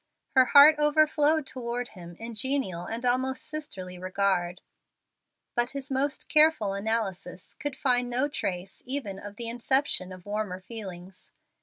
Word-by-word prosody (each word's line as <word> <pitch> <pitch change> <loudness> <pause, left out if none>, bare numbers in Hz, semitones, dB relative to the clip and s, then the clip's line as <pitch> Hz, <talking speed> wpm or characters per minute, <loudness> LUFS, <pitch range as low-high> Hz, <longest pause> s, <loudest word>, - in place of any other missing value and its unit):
Her 260 -1 +5
heart 295 +3 +8
overflowed 300 0 +3
toward 245 -1 -4
him 175 -3 -11
in 230 +5 -7
a - - -9
genial 215 -7 0
and 230 +2 -4
almost 260 +1 0
sisterly 190 -13 -6
regard, 185 -1 0 0.9
but 240 0 +1
his 275 0 -5
most 270 +1 -1
careful 305 -10 +4
analysis 200 -3 -3
could 290 -3 -4
find 245 -2 +1
no 255 +4 +1
trace 190 -10 -4
even 245 -8 -2
of 205 0 -9
the 235 +1 -3
inception 240 -4 0
of 185 -1 -11
warmer 205 -3 -3
feelings. 190 -3 -8
235 Hz, 145 wpm, -27 LUFS, 190-275 Hz, 0.9 s, heart